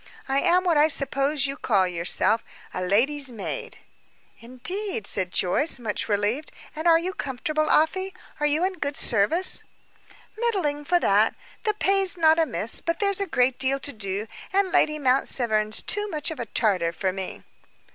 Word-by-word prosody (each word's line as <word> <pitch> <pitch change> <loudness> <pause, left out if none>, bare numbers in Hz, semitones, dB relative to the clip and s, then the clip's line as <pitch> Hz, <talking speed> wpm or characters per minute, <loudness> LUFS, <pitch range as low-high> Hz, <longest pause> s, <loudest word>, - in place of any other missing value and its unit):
I 270 +1 +1
am 360 +3 +3
what 345 -4 +2
I 300 +1 +5
suppose 275 0 +1
you 275 0 -2
call 200 -10 +1
yourself 180 +5 +1 0.3
a 185 - -4
lady's 255 +9 +1
maid." 220 -4 -6 0.6
"Indeed!" 255 - -5
said 185 -3 -1
Joyce, 235 - +2
much 225 -3 -3
relieved. 210 +9 -1 0.2
"And 315 +2 -2
are 330 -1 +7
you 360 +3 -3
comfortable, 305 - -2
Afy? 375 +5 +2 0.3
Are 295 - +2
you 300 +4 +2
in 375 -2 -4
good 285 -1 -3
service?" 245 - +1 0.8
"Middling, 350 -11 -1
for 350 +3 +2
that. 210 -5 +2 0.3
The 425 -1 +1
pay's 390 -2 +2
not 320 -1 +4
amiss, 265 -8 +2
but 335 - -2
there's 400 -1 +1
a 395 - -1
great 255 -5 +1
deal 270 +1 +1
to 285 +1 -1
do, 200 -1 -3 0.3
and 385 0 +1
Lady 305 -2 +2
Mount 265 -2 +2
Severn's 215 -3 0
too 415 0 0
much 305 -3 -2
of 320 - -7
a 235 - -4
Tartar 185 -7 +1
for 185 +1 -2
me." 190 -1 -6
280 Hz, 170 wpm, -24 LUFS, 220-335 Hz, 0.8 s, are